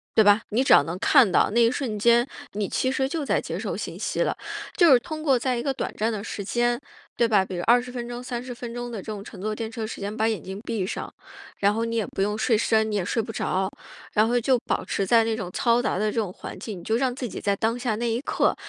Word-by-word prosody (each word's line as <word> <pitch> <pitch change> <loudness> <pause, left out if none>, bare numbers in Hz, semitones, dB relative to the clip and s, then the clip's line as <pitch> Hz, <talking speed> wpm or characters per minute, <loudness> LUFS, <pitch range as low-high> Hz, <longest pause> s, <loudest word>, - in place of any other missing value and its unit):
对 220 - +7
吧？ 205 +1 +5
你 230 +5 +2
只 - - +5
要 - - +8
能 165 +5 -4
看 260 -9 +5
到， - - +3
那 235 +2 +3
一 230 - +6
瞬 235 -6 -3
间， 235 +3 +4 0.3
你 205 0 -1
其 260 - 0
实 265 0 0
就 315 0 -2
在 - - +2
接 - - -5
受 - - -3
信 - - -6
息 - - -1
了。 - - +1 0.4
就 345 -5 +6
是 255 - +8
通 310 +4 -6
过 275 -5 +3
在 250 0 0
一 235 - -2
个 275 - 0
短 - - -4
暂 220 +2 +1
的 205 -2 -4
时 205 - -5
间， 240 +4 +1 0.4
对 235 - +3
吧？ 210 -4 +4
比 185 - -6
如 175 - -2
20 245 +1 +4
分 240 -1 -5
钟、 240 +1 -6
30 245 0 -5
分 235 -1 -7
钟 240 0 -5
的 225 - -5
这 - - -15
种 210 -2 -5
乘 - - -11
坐 215 +2 -2
电 225 0 -4
车 225 -2 -4
时 - - -7
间 205 +2 -4
把 220 0 +1
眼 220 - -2
睛 190 +1 -7
闭 195 -5 -2
上， - - -5 0.4
然 200 +1 +3
后 225 - -1
你 230 - -3
也 215 - 0
不 - - -4
用 210 +2 0
睡 225 0 +2
深， 220 0 +2
你 - - -1
也 200 - 0
睡 230 - 0
不 225 - -6
着， 190 -1 -1 0.4
然 215 - +4
后 245 +1 +2
就 255 +2 +3
保 - - -2
持 195 - -1
在 230 +3 +5
那 225 -1 0
种 190 -5 -4
嘈 235 +3 +2
杂 210 - -1
的 215 - +1
这 - - -9
种 200 -4 -4
环 - - -8
境， 210 -5 -6
你 - - -12
就 220 - 0
让 255 -1 +1
自 255 -2 -4
己 - - -7
在 200 - +1
当 225 +4 0
下 245 -3 -1
那 235 0 -1
一 230 - 0
刻。 - - +1
225 Hz, 305 characters per minute, -25 LUFS, 210-245 Hz, 0.4 s, 要